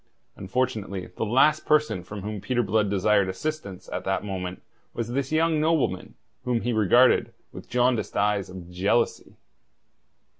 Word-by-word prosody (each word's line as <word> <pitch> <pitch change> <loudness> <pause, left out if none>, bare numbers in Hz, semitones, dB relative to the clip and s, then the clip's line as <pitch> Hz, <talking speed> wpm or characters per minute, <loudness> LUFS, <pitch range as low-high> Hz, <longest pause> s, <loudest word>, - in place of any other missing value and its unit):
Unfortunately 100 -4 -3
the - - -1
last 150 +7 +4
person 150 -11 +2
from 100 0 -8
whom 105 -1 -5
Peter 120 +1 0
Blood 105 0 +1
desired 100 0 +2
assistance 100 -2 -5
at - - -4
that 95 +1 -1
moment 95 -2 -5 0.3
was 115 -1 -3
this 135 +3 -2
young 160 0 +2
nobleman, 155 - 0 0.3
whom 120 -2 0
he 120 - -1
regarded 115 +4 +4 0.2
with - - -10
the - - -33
jaundiced 125 -1 +1
eyes 100 -2 +1
of 90 -2 -9
jealousy. 100 +6 0
110 Hz, 150 wpm, -25 LUFS, 95-130 Hz, 0.3 s, last